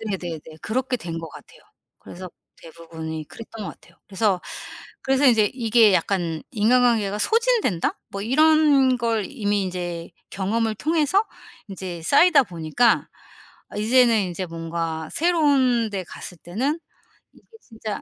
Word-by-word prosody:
네네네. 180 -7 -4 0.2
그렇게 250 +3 -1
된 165 -6 -6
것 165 -1 -7
같아요. - - -15 0.4
그래서 185 +1 -10 0.3
대부분이 160 -1 -8
그랬던 225 -1 -9
것 - - -5
같아요. - - -22
그래서, 195 -2 0 0.6
그래서 270 +1 +1
인제 220 -5 +4
이게 230 -3 +4
약간 175 -4 0
인간관계가 225 -2 +2
소진된다 455 - +1
뭐 200 - -6
이런 280 0 +4
걸 230 -3 0
이미 205 -7 -1
인제 175 -2 -5 0.2
경험을 215 +3 -1
통해서 320 - +1 0.4
인제 185 -3 -7
쌓이다 290 - +5
보니까 170 +6 +1 0.6
아 - - -11
이제는 235 +2 +4
인제 180 +2 -4
뭔가 165 -1 -4
새로운 280 -9 +2
데 195 -2 -4
갔을 180 - -9
때는 255 - -2 0.5
이게 - - -24
진짜 220 -3 -7
215 Hz, 295 characters per minute, -23 LUFS, 175-255 Hz, 0.6 s, 쌓이다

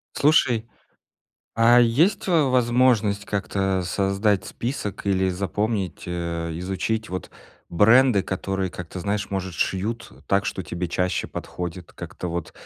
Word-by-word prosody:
Слушай, 125 -6 +3 0.9
а 120 +2 +6
есть, 145 - +2
э, 170 -4 +4
возможность 120 -5 +2
как-то 95 -2 -1
создать 100 +2 +1
список 115 -6 -5
или 95 -1 +2
запомнить, 100 +2 -2
э, 85 -1 -3
изучить, 105 +4 -2
вот, 95 +1 -5 0.4
бренды, 110 +3 +5
которые, 95 0 -2
как-то, 90 +1 -8
знаешь, 100 +2 -2
может 95 -2 -3
шьют 110 +7 -2 0.2
так, 100 0 +2
что 95 - -3
тебе 85 +3 -4
чаще 90 +2 -1
подходит, 90 0 -6
как-то, - - -7
вот, 85 -1 -4
100 Hz, 125 wpm, -24 LUFS, 90-115 Hz, 0.9 s, а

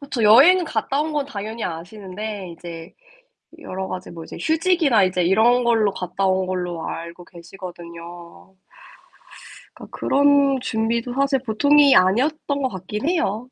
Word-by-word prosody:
그쵸. 280 -5 -4
여행 295 - +6
갔다 270 +2 -2
온 310 0 -4
건 290 -2 -1
당연히 220 -3 -6
아시는데 190 +3 -7
이제 165 -1 -10 0.7
여러 190 -8 -6
가지 185 0 -7
뭐 165 -1 -9
이제 - - -10
휴직이나 320 - +2
이제 185 -1 0
이런 230 +7 +3
걸로 225 -3 +2
갔다 185 +2 -3
온 190 0 +1
걸로 180 -3 -4
알고 170 +1 -7
계시거든요. 175 0 -12 1.2
그러니까 - - -12
그런 280 -1 +3
준비도 230 +2 -2
사실 275 0 +1
보통이 280 +4 +4
아니었던 280 +9 +1
것 260 - +1
같긴 210 - -5
해요. 250 - -1
215 Hz, 305 characters per minute, -21 LUFS, 185-275 Hz, 1.2 s, 여행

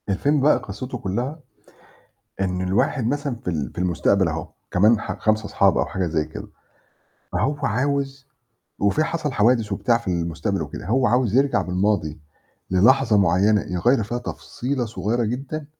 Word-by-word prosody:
الفيلم 140 +9 +1
بقى 150 +3 +5
قصِّته 125 +6 -6
كلّها، 120 - -3 1.0
إن 90 -1 -1
الواحد 100 +6 +1
مثلًا 140 0 -1
في - - -12
ال 75 -5 -2
في - - -7
المستقبل 90 +1 +2
أهو 80 -1 -3 0.2
كمان 105 +5 +4
ح - - -5
5 110 0 +1
أصحاب 100 -1 +2
أو - - +2
حاجة 95 -2 -2
زي 80 -1 0
كده، 80 - -9 0.9
فهو 145 +2 0
عاوز 140 +2 -1 0.5
وفي 100 +10 +2
حَصَل 160 -3 -2
حوادث 115 -2 +2
وبتاع 115 +4 +2
في 115 - -8
المستقبل 85 -3 -1
وكده، - - -7
هو 125 +5 +2
عاوز 120 -2 +2
يرجع 140 +1 +3
بالماضي 90 -4 -1 0.5
للحظة 115 +5 +4
معيّنة 100 +3 +3
يغيّر 110 +8 +1
فيها 120 +4 -3
تفصيلة 125 +1 -4
صغيّرة 110 +3 -1
جدًا 135 +6 -4
110 Hz, 150 wpm, -22 LUFS, 95-130 Hz, 1.0 s, بقى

